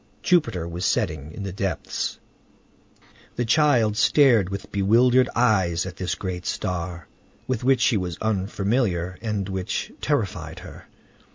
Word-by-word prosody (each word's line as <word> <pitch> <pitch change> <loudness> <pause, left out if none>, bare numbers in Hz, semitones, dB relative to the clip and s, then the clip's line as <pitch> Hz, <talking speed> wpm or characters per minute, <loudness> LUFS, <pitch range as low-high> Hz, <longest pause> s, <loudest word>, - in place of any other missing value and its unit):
Jupiter 115 - +2
was 85 +2 -5
setting 75 -1 -1
in 100 - -7
the 95 -2 -5
depths. 95 -5 -3 1.2
The 120 - -1
child 115 -4 +3
stared 120 -9 +4
with 100 0 -6
bewildered 120 +6 +4
eyes 95 -8 +2
at 95 -1 -7
this 90 -1 -2
great 90 -3 -5
star, 85 -2 -3 0.4
with 130 -2 -2
which 130 -1 +3
she 115 - +3
was 90 -4 -3
unfamiliar, 100 -3 -1
and 105 -4 -2
which 95 -2 -3
terrified - - -2
her. - - -12
100 Hz, 130 wpm, -24 LUFS, 90-120 Hz, 1.2 s, stared